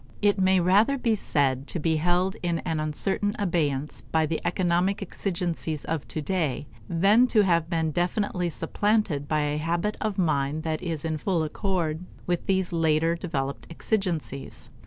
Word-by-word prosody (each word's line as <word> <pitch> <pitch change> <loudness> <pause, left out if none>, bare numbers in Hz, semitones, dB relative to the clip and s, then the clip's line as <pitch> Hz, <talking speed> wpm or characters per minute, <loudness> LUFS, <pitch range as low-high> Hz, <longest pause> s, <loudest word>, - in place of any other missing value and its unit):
It 205 -1 +2
may 190 0 +4
rather 205 +10 +4
be 235 -3 +1
said 140 -9 0
to 175 - -3
be 160 0 +1
held 180 +4 +1
in 170 -2 0
an 160 -1 -1
uncertain 190 +7 0
abeyance 150 -7 0
by 160 -1 0
the 160 +1 -2
economic 180 +2 +1
exigencies 170 -5 -3
of 160 -3 -3
today, 155 -3 -2 0.2
than 200 +8 +4
to 220 -3 +4
have 170 -3 +2
been 160 -3 0
definitely 180 +1 0
supplanted 170 -3 0
by 155 0 +1
a 150 0 0
habit 170 +6 -1
of 215 -2 -1
mind 155 -3 0
that 160 -1 -2
is 165 -4 -3
in 155 -1 -2
full 175 -1 0
accord 170 -1 -2 0.2
with 175 -1 -1
these 190 -2 +1
later 165 0 +2
developed 140 -6 -4
exigencies. 165 - -3
170 Hz, 155 wpm, -26 LUFS, 155-190 Hz, 0.2 s, may